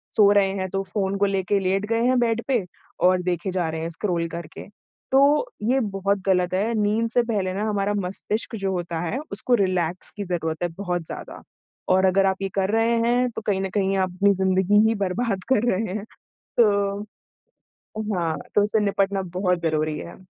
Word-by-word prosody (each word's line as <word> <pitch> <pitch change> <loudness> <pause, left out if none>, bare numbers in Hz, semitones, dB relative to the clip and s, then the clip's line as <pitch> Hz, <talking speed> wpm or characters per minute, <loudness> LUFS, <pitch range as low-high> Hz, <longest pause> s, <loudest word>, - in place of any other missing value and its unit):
सो 205 -3 +6
रहे 200 -1 +4
हैं 190 0 -2
तो 195 +1 -1
फ़ोन 195 0 -2
को 200 - +4
लेके 195 0 0
लेट 195 +2 0
गए 230 0 +1
हैं 255 +1 +3
बेड 230 -1 +1
पे 240 -9 +1 0.4
और 185 0 +3
देखे 180 +1 -1
जा 180 -3 -1
रहे 160 0 -4
हैं 165 - -3
स्क्रॉल 170 -1 -1
करके। 170 -2 -8 0.5
तो 290 - +4
ये 255 +5 +2
बहुत 200 -1 -1
गलत 180 -1 +2
है, 210 +5 +1
नींद 220 +3 +1
से 245 0 +3
पहले 200 -5 -1
ना 200 - -2
हमारा 205 0 0
मस्तिष्क 205 +4 -3
जो 195 -1 -1
होता 170 -2 -3
है 175 +10 -2
उसको 245 +5 +1
रिलैक्स 185 -4 -1
की 205 - -3
ज़रूरत 165 -2 -2
है 175 - 0
बहुत 180 -4 -2
ज़्यादा। - - -8 0.5
और 190 - +3
अगर 190 +1 +3
आप 190 0 -1
ये 195 - -1
कर 195 -1 +1
रहे 225 +1 +2
हैं 245 +1 +2
तो 220 - -6
कहीं 195 -2 +1
न 195 - -2
कहीं 195 -1 +1
अपनी 195 +3 +2
ज़िंदगी 190 +2 +3
ही 225 - +1
बर्बाद 195 0 -2
कर 240 0 +2
रहे 190 0 -1
हैं। 210 - -4 0.5
तो 200 -2 +3 1.1
हाँ, 165 -2 -1 0.2
तो 205 - +5
उससे 215 +1 +1
निपटना 195 0 +1 0.2
बहुत 180 -2 +1
ज़रूरी 155 -1 0
है। 180 +2 -10
195 Hz, 195 wpm, -24 LUFS, 180-210 Hz, 1.1 s, सो